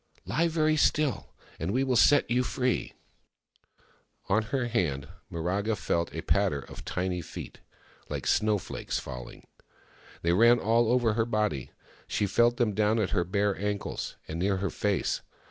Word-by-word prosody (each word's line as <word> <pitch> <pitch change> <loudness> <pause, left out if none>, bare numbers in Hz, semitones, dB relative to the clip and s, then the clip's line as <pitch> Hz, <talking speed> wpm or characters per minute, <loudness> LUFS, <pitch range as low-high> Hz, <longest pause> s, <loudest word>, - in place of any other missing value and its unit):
" - - -32
Lie 165 +2 +1
very 155 -1 +2
still, 150 -2 +1 0.2
and 80 - -2
we 130 +6 +1
will 130 -2 +1
set 145 +4 +5
you 125 +1 +2
free! 125 0 -1 0.6
" - - -35
On 110 +3 +3
her 125 +3 -1
hand, 80 - -1 0.2
Miraga 95 +6 -1
felt 85 -1 -1
a - - -4
patter 70 - +1
of - - -11
tiny 90 -1 -2
feet, 75 - -9 0.5
Uke - - -4
snowflakes 105 -2 0
falling. 60 -1 -8 0.8
They 85 +1 +3
ran 115 +5 +6
all 115 +1 +2
over 120 -3 +3
her 110 +1 +1
body; 105 - -1 0.4
she 105 - 0
felt 120 +4 +3
them 115 -4 +1
down 105 +2 +2
at 105 -4 0
her 90 -4 +2
bare 100 +2 0
ankles, 105 0 -3
and 80 +2 -4
near 95 +2 +1
her 100 +1 -2
face. 100 -2 0
105 Hz, 160 wpm, -28 LUFS, 90-120 Hz, 0.8 s, ran